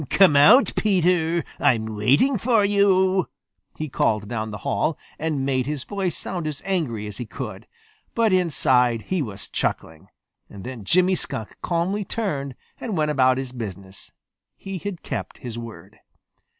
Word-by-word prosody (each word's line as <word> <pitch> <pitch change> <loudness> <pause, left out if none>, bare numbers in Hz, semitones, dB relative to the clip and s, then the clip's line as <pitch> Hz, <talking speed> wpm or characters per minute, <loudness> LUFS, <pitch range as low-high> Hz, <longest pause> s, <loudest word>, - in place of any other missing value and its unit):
"Come 190 -7 +5
out, 210 - +7
Peter. 175 -5 +2
I'm 110 -4 +1
waiting 140 - +3
for 225 -1 +3
you!" 190 -2 +3 0.5
he 155 - -3
called 105 -6 0
down 110 -1 -3
the 105 - -6
hall, 160 - 0 0.2
and 150 -4 -1
made 130 -2 0
his 145 -3 -3
voice 195 -5 -3
sound 175 -4 -4
as 150 -2 -4
angry 150 - -1
as 105 -1 -7
he 120 - -6
could. 95 - -7 0.5
But 225 -4 +3
inside 125 -10 +2
he 185 -3 -1
was 105 -7 -6
chuckling. 80 -1 -3 0.4
Then 105 +2 -8
Jimmy 185 - +4
Skunk 110 - -4
calmly 180 +4 -1
turned 145 - -3 0.2
and 215 -7 -3
went 150 -1 +1
about 130 -3 +3
his 130 -1 -4
business. 100 -5 -8 0.5
He 195 -1 -6
had 195 -2 -6
kept - - -5
his 120 -2 -7
word. 115 -2 -10
150 Hz, 150 wpm, -23 LUFS, 120-185 Hz, 0.5 s, out